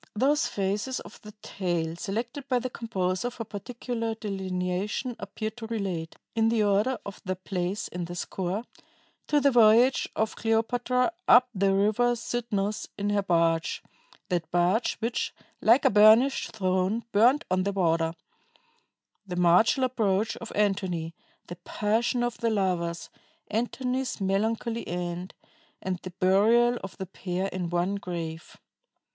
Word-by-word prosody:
Those 285 +8 +2
phases 205 +6 -2
of - - -13
the 210 0 -11
tale 170 -4 -2
selected 235 - -4
by 255 - +3
the 250 +1 -3
composer 195 -2 -2
for 240 -1 -6
particular 230 +2 -4
delineation 195 +3 -3
appear 215 -1 -4
to 225 0 -9
relate 190 -8 -3 0.2
in 225 0 +2
the 225 -2 +2
order 210 +5 +2
of 200 - -8
their 185 0 -2
place 185 +1 -3
in 175 -1 -5
the 175 +1 -7
score 185 +4 -3 0.6
to 295 - +3
the 280 0 +4
voyage 240 +2 +5
of 220 0 -1
Cleopatra 245 +4 +1 0.2
up 250 +1 +7
the 195 -1 +2
River 215 +5 +2
Cydnus 220 -3 -2
in 205 0 -1
her 205 0 +2
barge 165 -3 +1 0.5
(that 175 -3 -1
barge 175 +6 +2
which, 230 +1 -2 0.3
"like 235 +5 +5
a - - +6
burnished 220 +6 +5
throne, 190 +3 0
burnt 240 +8 +4
on 185 0 +2
the 200 +2 0
water"); 165 -3 +1 1.1
the 180 - -4
martial 180 - +4
approach 220 -5 +1
of 230 - -8
Antony; 190 -5 0 0.3
the 175 - -8
passion 220 +7 0
of 240 -1 -2
the 230 - +1
lovers; 180 -5 -1 0.4
Antony's 250 +3 -2
melancholy 220 +4 -1
end, 175 +1 -4 0.4
and 185 -2 -3
the 185 - -7
burial 215 +7 +3
of 195 - -8
the 190 - -4
pair 185 +1 -3
in 180 -3 -4
one 175 +3 0
grave. 170 -4 -6
205 Hz, 140 wpm, -27 LUFS, 185-235 Hz, 1.1 s, up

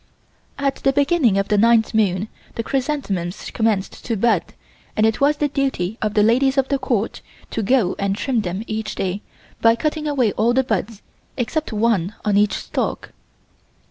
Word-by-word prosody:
At 275 -1 0
the 270 - +2
beginning 280 - +3
of 195 0 0
the 210 -1 +3
ninth 230 0 +4
moon 205 -2 +1 0.3
the 230 - -2
chrysanthemums 235 - -2
commence 220 -4 +1
to 230 -2 -5
bud 210 -4 +3 0.6
and 215 - +4
it 220 +3 +1
was 290 +1 +3
the 295 - +1
duty 265 -8 -2
of 215 -1 -1
the 210 - +5
ladies 265 +5 +3
of 270 -1 +2
the 275 -1 +1
Court 230 -5 -1 0.3
to 225 - -2
go 215 -3 +2
and 195 0 0
trim 245 +1 0
them 190 +2 -4
each 220 -1 -4
day 195 +1 -2 0.4
by 230 0 +5
cutting 305 +4 -2
away 260 -7 +2
all 235 +4 +1
the 265 - +3
buds 220 -2 -3 0.3
except 275 +5 -2
one 215 -3 +1
on 210 -1 +2
each 205 0 +3
stalk. - - -3
225 Hz, 175 wpm, -21 LUFS, 205-265 Hz, 0.6 s, the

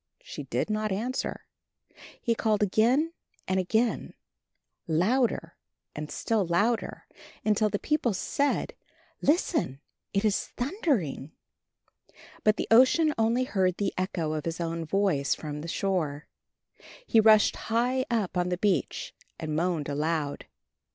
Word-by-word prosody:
She - - -7
did - - -1
not 215 0 -1
answer. 235 +7 -3 0.7
He 235 - +1
called 215 -2 +1
again 245 - +2 0.3
and 190 0 +1
again, 220 +6 0 0.7
louder 180 +1 +1 0.4
and 150 0 -5
still 225 -3 0
louder, 205 +7 0 0.4
until 215 0 +3
the 205 - -1
people 300 -1 0
said, 280 +9 0 0.5
"Listen, 300 - +1 0.3
it 200 +2 0
is 210 -2 +1
thundering!" 245 - -1 1.1
But 215 0 +4
the - - -2
Ocean 265 +7 +6
only 230 +3 +2
heard 190 -7 0
the 205 - -1
echo 180 -4 -2
of 155 -1 -3
his 165 0 -3
own 165 -1 -2
voice 180 -6 +1
from 150 -1 -6
the 165 - -6
shore. 160 -6 -1 0.8
He 225 - +4
rushed 215 -1 +6
high 245 +3 +2
up 215 -6 -1
on 180 0 +1
the 180 - -1
beach 200 0 -1 0.3
and 155 -2 -3
moaned 165 -2 0
aloud. 150 0 -2
205 Hz, 130 wpm, -28 LUFS, 165-235 Hz, 1.1 s, Ocean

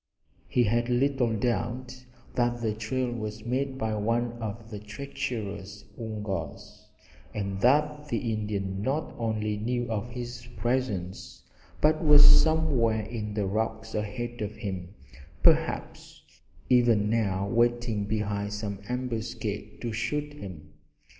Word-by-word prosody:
He 125 - +3
had 120 +2 +1
little 125 -1 +2
doubt 125 +3 -2 0.3
that 120 0 +1
the 110 -2 0
trail 120 +3 -1
was 110 -2 -5
made 130 +2 -1
by 110 -3 -1
one 115 +3 +1
of 110 +1 -5
the 105 - -5
treacherous 105 -4 -5
Woongas, 105 -8 -5 0.5
and 100 -2 -2
that 150 +3 +3
the 120 -5 -1
Indian 100 -2 -2
not 140 +8 -1
only 110 -2 0
knew 120 +2 -1
of 110 +2 -2
his 120 0 -6
presence, 105 -6 -2 0.4
but 155 +2 +4
was 150 -1 +9
somewhere 145 -9 +5
in 105 -2 -4
the 105 -2 +1
rocks 110 +2 -2
ahead 120 +3 -3
of 105 0 -3
him, 95 -3 -5 0.5
perhaps - - +2 0.4
even 120 -4 +5
now 100 -3 +1
waiting 120 -1 +2
behind 105 -1 -1
some 105 -2 -3
ambuscade 115 -4 -3
to 120 - -2
shoot 145 +6 -1
him. 85 - -9
115 Hz, 125 wpm, -28 LUFS, 105-125 Hz, 0.5 s, was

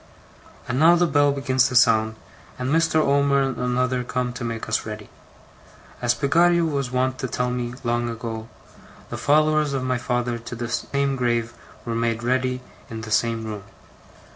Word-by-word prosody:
And 125 - -1
now 165 +3 +7
the 175 0 +3
bell 145 -3 +3
begins 130 -2 +2
to 125 - -5
sound, 110 -2 +4 0.4
and 125 +2 -2
Mr. 165 0 +2
Omer 140 -2 +3
and 135 -1 -2
another 125 0 0
come 125 0 -2
to 120 - -6
make 115 -1 -4
us - - 0
ready. 105 -1 -8 0.9
As 120 -1 +2
Peggotty 170 +5 +3
was 140 -5 -1
wont 130 +1 -1
to 130 - -2
tell 125 0 -1
me, 120 -1 -3
long 120 0 0
ago, 115 -1 -6 0.6
the - - -4
followers 155 0 +2
of 135 -2 -1
my 130 -1 0
father 120 -1 -1
to 115 +1 -8
the 120 0 -5
same 140 +2 -1
grave 120 -2 0 0.3
were 115 - -3
made 115 0 -1
ready 130 +1 0 0.3
in 110 -2 -6
the 110 0 -8
same 115 +1 +1
room. 105 -2 -5
125 Hz, 175 wpm, -23 LUFS, 120-140 Hz, 0.9 s, now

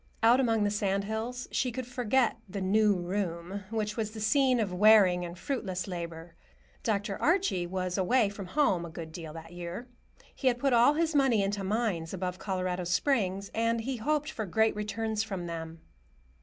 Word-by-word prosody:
Out 235 +3 +6
among 225 -4 +2
the 205 - +1
sand 200 -1 0
hills 225 +4 -4
she 255 - 0
could 255 +1 -4
forget 245 -1 +1
the 200 +2 -4
"new 205 +2 +3
room" 180 +1 -3
which 215 -1 -2
was 220 -2 -2
the 220 0 -9
scene 255 +4 +3
of 200 -5 -1
wearing 190 -2 +6
and 175 0 -7
fruitless 185 -6 -3
labor. 170 -2 -6 0.5
Dr. 205 -4 -1
Archie 335 - +2
was 185 0 -2
away 230 +4 +3
from 200 -1 -7
home 195 - +2
a 170 - -6
good 160 0 -8
deal 160 -2 -7
that 165 +1 -10
year. 175 +7 -6 0.5
He 265 - -2
had 245 -1 +3
put 270 +1 +1
all 240 +5 +5
his 325 0 +1
money 265 -8 +3
into 200 0 -2
mines 190 -5 -1
above 185 0 -4
Colorado 185 -2 -2
Springs, 195 -1 0
and 230 +1 +1
he 255 +2 -3
hoped 300 +6 -1
for 220 -7 -4
great 220 +4 +2
returns 215 +1 -2
from 195 -5 -4
them. 165 -1 -6
205 Hz, 185 wpm, -29 LUFS, 180-235 Hz, 0.5 s, Out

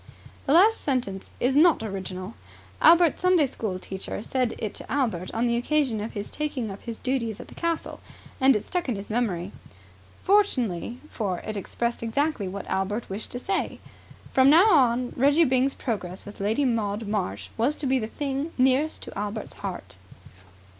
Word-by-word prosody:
The 275 - +3
last 415 +7 +5
sentence 240 -9 -2
is 260 +2 +1
not 310 -4 +5
original. 190 -1 -5 0.5
Albert's 340 -1 +6
Sunday 365 -4 +4
school 215 -7 -4
teacher 190 +2 -5
said 255 -2 -1
it 215 - -4
to - - -10
Albert 225 -11 -1
on 230 +2 0
the 235 -1 +2
occasion 255 -3 +1
of 220 - -5
his 205 -1 -5
taking 275 -8 -3
up 195 - -9
his 230 -1 -6
duties 235 -5 -2
at - - -10
the - - -12
castle, 335 -1 -3 0.4
and 265 -1 +5
it 210 - -1
stuck 355 -6 -2
in 240 - 0
his 200 +2 -7
memory. 200 -6 -1 0.7
Fortunately, 250 - +2
for 195 -5 -2
it 215 - -5
expressed 235 +4 -3
exactly 230 -1 0
what 195 +1 -5
Albert 195 +3 -2
wished 205 +3 -4
to - - -3
say. 385 +10 -2 0.6
From 265 +1 +6
now 355 +9 +7
on 250 -5 +3
Reggie 285 +6 +4
Byng's 260 0 +2
progress 190 -7 -4
with 205 - -10
Lady 220 +8 +1
Maud 220 -3 -1
Marsh 100 - -2
was 265 +7 +1
to 295 - -4
be 265 0 +2
the 215 - -3
thing 280 +5 -3
nearest 265 +4 +2
to - - -9
Albert's 210 +1 -4
heart. 135 - -6
235 Hz, 175 wpm, -26 LUFS, 205-280 Hz, 0.7 s, now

